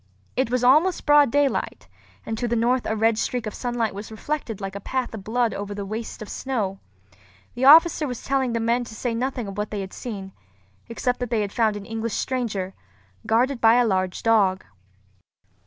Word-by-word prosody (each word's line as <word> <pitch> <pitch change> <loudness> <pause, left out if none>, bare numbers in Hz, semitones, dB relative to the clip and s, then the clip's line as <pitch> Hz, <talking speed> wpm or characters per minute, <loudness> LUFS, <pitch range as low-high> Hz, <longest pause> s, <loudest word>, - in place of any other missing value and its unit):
It 260 -2 +1
was 250 0 0
almost 310 +9 +4
broad 290 -2 +6
daylight, 285 +1 0 0.4
and 225 - -3
to 245 - -1
the 235 - 0
north 240 +2 +1
a 220 - 0
red 220 0 +2
streak 245 -2 -2
of 215 - -4
sunlight 240 -4 -2
was 205 +2 -7
reflected 225 0 -4
like 195 -1 -5
a - - -4
path 255 +4 -3
of 210 -3 -7
blood 230 +2 0
over 205 0 -5
the 200 -1 -5
waste 220 +2 -5
of - - -10
snow. 210 -8 -3 0.7
The 250 +2 -1
officer 315 +1 +7
was 250 -3 -6
telling 265 -3 0
the 230 - 0
men 235 +2 +1
to 220 - -10
say 240 +1 -2
nothing 250 +1 -2
of 195 +1 -6
what 210 - -2
they 205 -2 -4
had 190 -1 -7
seen, 195 -5 -6 0.6
except 245 +2 -1
that 245 -2 -3
they 215 -3 0
found 215 0 +1
an 200 - -9
English 225 0 -3
stranger, 210 -8 -2 0.5
guarded 245 +3 +2
by 225 0 +6
a 245 0 +4
large 185 -3 -1
dog. 200 -5 +3
230 Hz, 200 wpm, -24 LUFS, 210-250 Hz, 0.7 s, officer